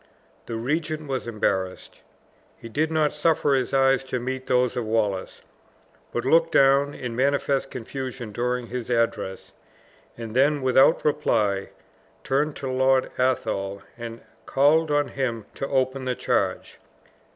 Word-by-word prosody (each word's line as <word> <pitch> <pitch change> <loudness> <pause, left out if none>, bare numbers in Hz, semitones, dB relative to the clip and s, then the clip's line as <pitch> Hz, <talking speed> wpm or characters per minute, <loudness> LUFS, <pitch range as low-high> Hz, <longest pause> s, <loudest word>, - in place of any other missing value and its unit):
The 115 - -4
regent 155 +5 -2
was 130 -3 -3
embarrassed. 95 -4 -2 0.6
He - - -10
did 155 +7 -1
not 155 -2 +2
suffer 150 -1 +2
his 130 -2 0
eyes 135 0 +3
to 130 -1 -2
meet 130 +1 -4
those 125 -1 +2
of 125 - -1
Wallace, 110 -4 -1 0.7
but 120 - -3
looked 165 +4 +4
down 140 +1 +4
in 120 -2 -5
manifest 140 +1 +1
confusion 130 -1 -6
during 125 +2 -2
this 125 -1 -5
address; 115 -5 -1 0.7
and 115 -1 -7
then, 140 +2 +3
without 130 +5 +4
reply, 105 -10 +1 0.5
turned 145 +3 0
to 135 - -5
Lord 130 0 +2
Athol, 100 -6 -1
and 115 -1 -8 0.3
called 150 +4 +3
on 145 -1 +1
him 120 -5 -3
to 135 - -4
open 130 0 0
the 125 -1 -1
charge. - - -1
130 Hz, 140 wpm, -24 LUFS, 115-140 Hz, 0.7 s, looked